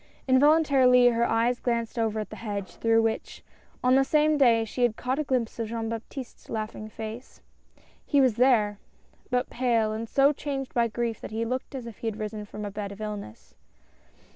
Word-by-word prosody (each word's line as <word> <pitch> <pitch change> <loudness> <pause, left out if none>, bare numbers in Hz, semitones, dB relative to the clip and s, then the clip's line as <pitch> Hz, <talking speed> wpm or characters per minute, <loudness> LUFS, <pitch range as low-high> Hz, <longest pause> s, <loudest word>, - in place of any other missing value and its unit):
Involuntarily 260 -3 +5
her 235 0 +1
eyes 235 +2 +1
glanced 235 -1 -2
over 220 -1 0
at 215 - -5
the - - -8
hedge, 205 -3 -5
through 225 0 +3
which, 225 0 -3 0.4
on 250 0 +4
the 270 +1 +5
same 305 +2 +3
day, 235 -5 +4
she 235 +3 -5
had 240 -3 +3
caught 255 +5 -2
a - - +1
glimpse 250 -5 -2
of 225 - -2
Jean 225 0 -3
Baptiste's 230 +3 -8
laughing 215 -1 -5
face. 220 +3 -8 0.6
He 285 - +2
was 255 -5 +3
there! 220 -5 +3 0.5
but 250 0 -1
pale 230 -3 +1
and 225 +1 -5
so 280 +1 +4
changed 275 -2 -5
by 235 -1 +2
grief 230 0 -3
that - - -7
he 225 +1 -2
looked 255 +3 -4
as 255 -3 -6
if 230 -3 -10
he 230 - -4
had 220 -1 -3
risen 215 -1 -5
from 210 0 -7
a 205 - -5
bed 200 0 -5
of 200 - -10
illness. 210 - -7
230 Hz, 195 wpm, -27 LUFS, 220-255 Hz, 0.6 s, Involuntarily